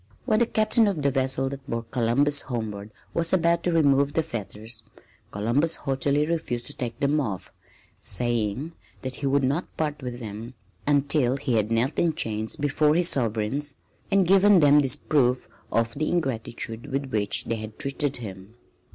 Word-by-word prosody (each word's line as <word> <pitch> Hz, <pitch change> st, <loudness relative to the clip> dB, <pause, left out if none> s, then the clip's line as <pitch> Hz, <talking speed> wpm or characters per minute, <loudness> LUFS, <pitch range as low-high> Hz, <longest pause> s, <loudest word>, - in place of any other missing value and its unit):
When 220 Hz, -4 st, +2 dB
the 235 Hz, -, +3 dB
Captain 220 Hz, 0 st, +3 dB
of 175 Hz, -8 st, -1 dB
the 140 Hz, -, +3 dB
vessel 135 Hz, 0 st, 0 dB
that 140 Hz, 0 st, -9 dB
bore 115 Hz, 0 st, -2 dB
Columbus 130 Hz, +5 st, +2 dB
homeward 110 Hz, -4 st, -5 dB, 0.2 s
was 170 Hz, +1 st, +1 dB
about 170 Hz, -1 st, +3 dB
to 175 Hz, -, +2 dB
remove 140 Hz, -3 st, +3 dB
the 160 Hz, -, +1 dB
fetters, 110 Hz, -1 st, -4 dB, 0.5 s
Columbus 125 Hz, +11 st, +1 dB
haughtily 140 Hz, +2 st, 0 dB
refused 155 Hz, -7 st, -2 dB
to -, -, -5 dB
take 120 Hz, -2 st, -5 dB
them 145 Hz, +2 st, +2 dB
off, 105 Hz, -9 st, -5 dB, 0.5 s
saying 120 Hz, +4 st, -1 dB, 0.3 s
that 130 Hz, -1 st, -4 dB
he 140 Hz, -, -2 dB
would 140 Hz, 0 st, +2 dB
not 140 Hz, +7 st, -1 dB
part 150 Hz, -2 st, -2 dB
with 125 Hz, -1 st, -6 dB
them 115 Hz, +2 st, -7 dB, 0.3 s
until 140 Hz, -2 st, +2 dB
he 135 Hz, -2 st, -2 dB
had 110 Hz, -2 st, +1 dB
knelt 115 Hz, +5 st, +1 dB
in 165 Hz, -2 st, +2 dB
chains 110 Hz, 0 st, -1 dB
before 150 Hz, +1 st, +2 dB
his 175 Hz, +1 st, +4 dB
sovereigns 125 Hz, +4 st, -1 dB, 0.3 s
and 195 Hz, -1 st, +3 dB
given 195 Hz, +1 st, +6 dB
them 145 Hz, -1 st, +6 dB
this 135 Hz, -2 st, +3 dB
proof 130 Hz, -4 st, +1 dB, 0.2 s
of 115 Hz, 0 st, +1 dB
the 155 Hz, +2 st, -1 dB
ingratitude 120 Hz, -4 st, -3 dB
with 135 Hz, 0 st, -2 dB
which 105 Hz, -3 st, +1 dB
they 115 Hz, -, -2 dB
had 110 Hz, 0 st, -8 dB
treated 140 Hz, 0 st, -1 dB
him. 100 Hz, -1 st, -9 dB
135 Hz, 170 wpm, -25 LUFS, 115-150 Hz, 0.5 s, given